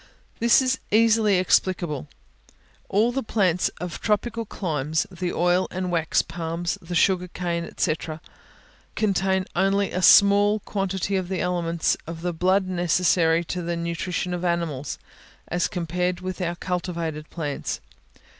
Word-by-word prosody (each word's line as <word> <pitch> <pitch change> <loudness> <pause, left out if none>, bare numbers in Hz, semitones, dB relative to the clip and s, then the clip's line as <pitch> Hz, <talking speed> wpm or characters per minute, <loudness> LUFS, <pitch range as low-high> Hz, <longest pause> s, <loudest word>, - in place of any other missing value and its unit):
This 235 +3 +5
is 260 0 0
easily 220 -2 +4
explicable. 175 -5 +1 0.8
All 220 +4 +3
the 270 +2 -1
plants 185 -6 +1
of 180 -1 -6
tropical 230 +1 -1
climates, 155 -5 -1
the 180 -1 -3
oil 175 +2 +2
and 185 -1 -3
wax 165 -2 +1
palms, 170 +1 -3
the 175 +1 -6
sugar 180 +2 +3
cane, 170 -1 -3
&c., 160 - +2 1.0
contain 190 -2 +1
only 195 +2 +2
a 185 - -2
small 205 +2 +6
quantity 195 -1 -2
of 185 -2 -2
the 190 -2 -2
elements 170 -2 0
of 165 0 -7
the 175 -1 -1
blood 185 +3 +2
necessary 175 -2 +2
to 180 +1 -4
the 170 0 -2
nutrition 170 +1 -2
of 175 0 -3
animals, 170 -6 -2 0.5
as 175 - +1
compared 180 0 -2
with 185 +1 -5
our 175 -1 -1
cultivated 170 -4 -4
plants. 150 -4 -4
180 Hz, 135 wpm, -24 LUFS, 170-195 Hz, 1.0 s, small